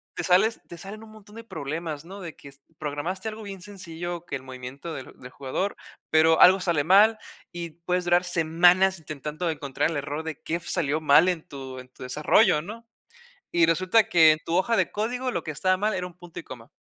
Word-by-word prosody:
te 175 - -3
sales 195 +6 +3
te 170 - -10
salen 205 +5 -9
un 220 - -14
montón 210 -1 -16
de 230 - -9
problemas, 160 -4 -5
¿no? 195 +2 -10
de 165 -3 -8
que 140 - -13 0.3
programaste 160 +7 -4
algo 220 0 -9
bien 195 -2 -8
sencillo, 175 -3 -7
que - - -4
el 130 - -7
movimiento 130 +5 -8
del 135 - -8
del 125 0 -11
jugador, 140 +10 -3 0.4
pero 160 +1 +5
algo 190 +2 +8
sale 170 -5 0
mal 210 +6 +5 0.3
y 170 -2 -6
puedes 180 +2 -2
durar 175 +1 +3
semanas 175 +2 +3
intentando 155 +3 -5
encontrar 145 -1 -1
el 160 - -3
error 145 +2 -4
de 160 -1 -6
qué 160 - -3
f 170 - -6
salió 155 0 0
mal 155 +4 +5
en 170 -3 -2
tu 135 -4 -8
en 125 0 -12
tu - - -13
desarrollo, 150 - +3
¿no? 230 +6 -10 0.7
Y 170 -1 +4
resulta 185 +6 +3
que 160 -2 +6
en 155 - -1
tu 165 - -2
hoja 230 +5 +2
de - - +1
código 245 +4 -2
lo 170 - -2
que - - -6
estaba 185 +5 +1
mal 210 +3 0
era 180 -1 -3
un 175 - -12
punto 175 -2 -11
y - - -8
coma. 120 -2 -11
170 Hz, 215 wpm, -25 LUFS, 150-190 Hz, 0.7 s, algo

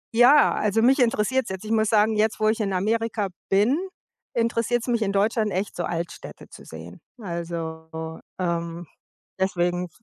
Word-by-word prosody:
ja, 260 +5 +6
also, 215 +1 +1
mich 265 +3 +4
interessiert's 240 +1 +1
jetzt. 190 +2 -6
Ich 215 - -4
muss 220 -1 +2
sagen, 215 0 +3
jetzt, 215 +1 +1
wo 215 - +2
ich 220 +1 +1
in 200 -2 -1
Amerika 215 +2 0 0.2
bin, 215 - +3 0.6
interessiert's 230 0 0
mich 235 -2 +1
in 200 - +1
Deutschland 210 +2 +1
echt, 190 +3 -3
so 175 - -2
Altstädte 170 0 -6
zu - - -13
sehen. - - -11 0.2
Also, 160 -3 -6 0.2
ähm, 170 -1 -2 0.5
deswegen 180 -1 0
210 Hz, 155 wpm, -24 LUFS, 175-225 Hz, 0.6 s, ja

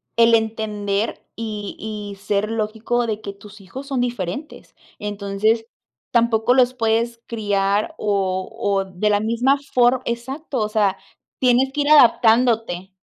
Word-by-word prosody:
el 230 0 +6
entender 215 -2 -2
y 210 -3 -5
y 210 -2 -6
ser 205 +2 -1
lógico 225 +2 -1
de 215 -1 -2
que 200 -2 -6
tus 205 +1 -14
hijos 265 +9 -9
son 270 -2 -2
diferentes. 240 - -5 0.2
Entonces, 205 +2 -1 0.5
tampoco 235 0 +3
los 255 -1 +3
puedes 230 0 0
criar 205 -2 0
o 190 -3 -1
o 200 -4 -1
de 190 +3 -1
la 205 - +3
misma 235 +6 +2 0.2
for 250 +1 +4
exacto, 265 +5 -4
o 210 - 0
sea, 210 -3 +1 0.4
tienes 255 +1 +3
que 295 - 0
ir 285 - 0
adaptándote. 230 -8 +4
220 Hz, 140 wpm, -21 LUFS, 205-240 Hz, 0.5 s, el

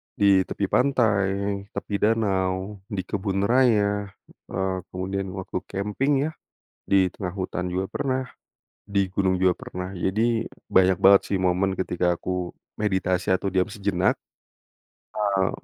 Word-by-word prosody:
Di 100 -2 +4
tepi 100 - -2
pantai, 100 -6 +1
tepi 100 -1 -3
danau, 100 -2 0
di 100 -5 -3
kebun 95 +1 -2
raya, 105 -4 +3 0.4
eee, 95 0 -1 0.2
kemudian 95 +1 -2
waktu 95 -2 -4
camping 105 +8 -1
ya, 155 - -1 0.6
di 95 -1 +5
tengah 95 -3 -4
hutan 90 -1 -3
juga 95 +2 -1
pernah, 130 -1 0 0.6
di 100 -1 0
gunung 95 -2 +2
juga 90 -1 +3
pernah. 90 0 -6
Jadi 95 +4 0 0.5
banyak 95 -1 +4
banget 100 0 +7
sih 100 - +2
momen 95 +1 +2
ketika 90 -1 0
aku 90 -1 -3 0.3
meditasi 95 -3 0
atau 95 - -3
diam 90 -1 +1
sejenak. 100 -4 0 1.0
Eee, 100 -3 +2
95 Hz, 130 wpm, -25 LUFS, 95-100 Hz, 1.0 s, banget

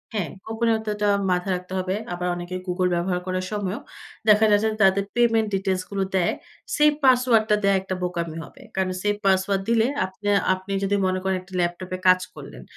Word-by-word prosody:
হ্যাঁ, 185 -7 -1 0.2
গোপনীয়তাটা 220 -2 0 0.2
মাথায় 180 +1 0
রাখতে 180 +1 -7
হবে। 185 +1 -1 0.2
আবার 180 0 -3
অনেকে 175 +1 -6
Google 180 0 +1
ব্যবহার 180 +1 0
করার 185 0 -2
সময়ও 205 +3 -3 0.5
দেখা 210 +1 +6
যাচ্ছে 205 +1 +4
যে, - - -8
তাদের 195 +1 +4
পেমেন্ট 230 -2 +3
ডিটেইলস 190 -1 -1
গুলো 200 -1 -1
দেয়। 180 -2 +2 0.4
সেভ 300 0 +6
পাসওয়ার্ড 250 -4 +4
টা 210 - +5
দেয়া 200 0 +4
একটা 190 0 -4
বোকামি 170 -2 -3
হবে। 265 - -14
কারণ 190 -1 0
সেভ 205 +1 +1
পাসওয়ার্ড 195 0 +2
দিলে 230 0 +3 0.2
আপনে 190 +2 -5 0.2
আপনি 185 +1 -6
যদি 200 +1 +1
মনে 185 0 0
করেন 190 0 0
একটা 185 +1 -17
ল্যাপটপে 180 +1 -2
কাজ 185 0 +7 0.2
করলেন। - - -10
190 Hz, 185 wpm, -24 LUFS, 185-210 Hz, 0.5 s, কাজ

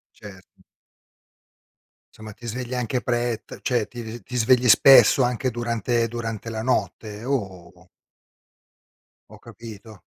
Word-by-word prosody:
Certo. 95 -3 -15 1.5
Insomma 110 -1 -11
ti 120 +3 -13
svegli 125 +2 -5
anche 125 0 -2
pre 120 -2 -2
t - - -11
cioè 120 -5 -1
ti 120 -1 -8
ti 110 - -8
v 120 -1 -9
ti 125 - -7
svegli 125 +1 +3
spesso 135 +4 +7
anche 125 +1 -1
durante 120 0 -1
durante 115 -1 -6
la 110 -1 -4
notte? 110 -2 -3
O? 95 -8 -5 1.4
Ho - - -14
capito. 110 -3 -13
115 Hz, 130 wpm, -23 LUFS, 110-125 Hz, 1.5 s, spesso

